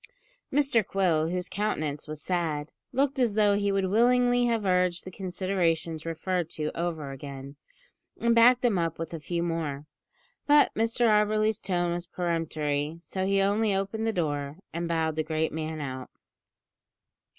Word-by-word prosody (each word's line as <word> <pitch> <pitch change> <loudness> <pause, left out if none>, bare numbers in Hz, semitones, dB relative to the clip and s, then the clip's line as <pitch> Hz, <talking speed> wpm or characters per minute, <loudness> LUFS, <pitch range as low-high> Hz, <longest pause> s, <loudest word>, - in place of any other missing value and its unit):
Mr 270 -5 +3
Quill, 175 -5 +1
whose 180 +1 -2
countenance 155 -9 -2
was 155 0 -7
sad, 160 -5 -1 0.2
looked 275 +1 0
as 235 -5 +2
though 210 -1 +4
he 200 0 +1
would 195 -1 +1
willingly 245 +4 +3
have 230 -3 0
urged 180 -1 +1
the 185 - -7
considerations 175 -4 -1
referred 175 +1 -2
to 155 -1 -3
over 165 -5 -3
again, 135 0 -8 0.6
and 235 0 +3
backed 240 +2 +6
them 225 -7 +2
up 165 -1 -1
with 165 0 -5
a 165 - -4
few 170 +2 -2
more; 155 -4 -3 0.6
but 295 0 +5
Mr 230 +2 +1
Auberly's 215 0 +3
tone 175 -2 0
was 175 0 -5
peremptory, 160 -4 -2
so 190 +2 -3
he 195 0 +3
only 205 +1 +2
opened 200 +3 -2
the - - +2
door, 145 -6 -2 0.2
and 170 +1 -2
bowed 160 -2 0
the 155 - 0
great 155 0 -1
man 160 0 -4
out. 130 -3 -5
175 Hz, 160 wpm, -27 LUFS, 160-210 Hz, 0.6 s, backed